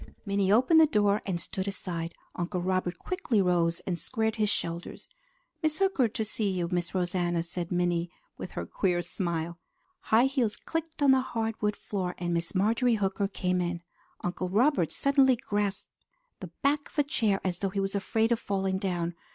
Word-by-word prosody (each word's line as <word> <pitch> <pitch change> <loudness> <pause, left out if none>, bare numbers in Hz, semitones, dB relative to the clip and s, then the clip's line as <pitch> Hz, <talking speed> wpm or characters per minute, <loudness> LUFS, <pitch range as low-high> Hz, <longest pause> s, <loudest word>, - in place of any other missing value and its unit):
Minnie 200 -1 +1
opened 255 +9 +6
the 315 - +7
door 205 -5 +2
and 180 -3 -1
stood 190 +2 -3
aside. 175 -4 -4 0.2
Uncle 180 +1 -2
Robert 180 -1 -1
quickly 365 - -1
rose, 175 -3 +2
and 175 -2 -3
squared 220 -2 -1
his 210 -1 +2
shoulders. 170 -3 -3 0.5
"Miss 310 -1 +1
Hooker 385 -11 +3
to 220 0 -3
see 210 -1 -1
you, 180 -3 -1
Miss 175 0 -1
Rosanna," 175 -2 0
said 170 0 -5
Minnie 175 -1 +1 0.3
with - - -7
her - - -4
queer 175 -3 0
smile. 170 -2 -3 0.5
High 225 +3 +5
heels 255 -6 +1
clicked 325 -2 -4
on 275 - +7
the 265 0 +5
hardwood 225 -4 -2
floor, 185 -4 -3
and 175 0 -2
Miss 170 +3 -2
Marjorie 225 +5 +3
Hooker 200 -1 0
came 180 -2 -1
in. 175 -1 -3 0.4
Uncle 180 +1 -2
Robert 220 - +3
suddenly 275 -2 +4
grasped 205 -3 -2 0.5
the - - -7
back 290 +1 +1
of - - -22
a 295 - +5
chair 220 -9 +1
as 180 -2 -1
though 195 - 0
he 195 +1 -3
was 195 0 -1
afraid 220 +3 +1
of 235 - +2
falling 190 -3 -1
down. 175 -3 -1
195 Hz, 180 wpm, -29 LUFS, 175-225 Hz, 0.5 s, the